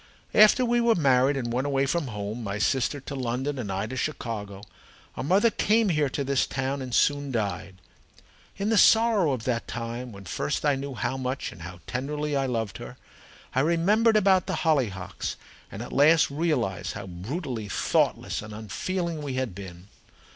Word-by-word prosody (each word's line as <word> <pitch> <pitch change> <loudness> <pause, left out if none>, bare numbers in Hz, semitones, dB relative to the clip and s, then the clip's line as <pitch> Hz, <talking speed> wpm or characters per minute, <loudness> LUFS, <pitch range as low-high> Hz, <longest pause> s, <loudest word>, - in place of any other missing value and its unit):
"After 215 +4 +6
we 240 0 +2
were 235 -1 +4
married 135 -2 +3
and 120 -3 -3
went 130 +3 0
away 135 -1 +1
from 150 +1 -1
home 105 +1 -5
my 100 -1 -3
sister 130 +6 +1
to 140 - -7
London 130 +2 -2
and 105 -6 -4
I 95 +2 -1
to 125 +4 -6
Chicago 110 -8 -4 0.5
our - - -4
mother 195 - +3
came 220 0 +2
here 150 -4 +1
to 140 - -2
this 140 0 +1
town 135 +1 -2
and 130 -1 -6
soon 145 +3 +2
died. 100 -5 -3 0.8
In 200 +2 -1
the 225 -2 +4
sorrow 220 -8 +5
of 125 -4 -3
that 120 -2 -1
time, 120 +1 -5
when 100 -2 -11
first 140 - -2
I 145 - +4
knew 135 0 -5
how 120 +3 -2
much 130 +1 -3
and 85 - -13
how 85 +1 -9
tenderly 145 +3 -3
I 135 -1 +1
loved 115 -4 -3
her, - - -9 0.6
I 130 - +1
remembered 200 +9 +3
about 190 -3 +3
the - - -2
hollyhocks, 100 - -1 0.4
and 105 - -6
at - - -9
last 150 +3 +5
realized 120 - -1
how - - -7
brutally 110 - -5
thoughtless - - 0
and 110 0 -9
unfeeling 165 - -3
we 140 -3 -4
had 130 -6 -2
been. 95 -1 -10
130 Hz, 185 wpm, -26 LUFS, 110-155 Hz, 0.8 s, After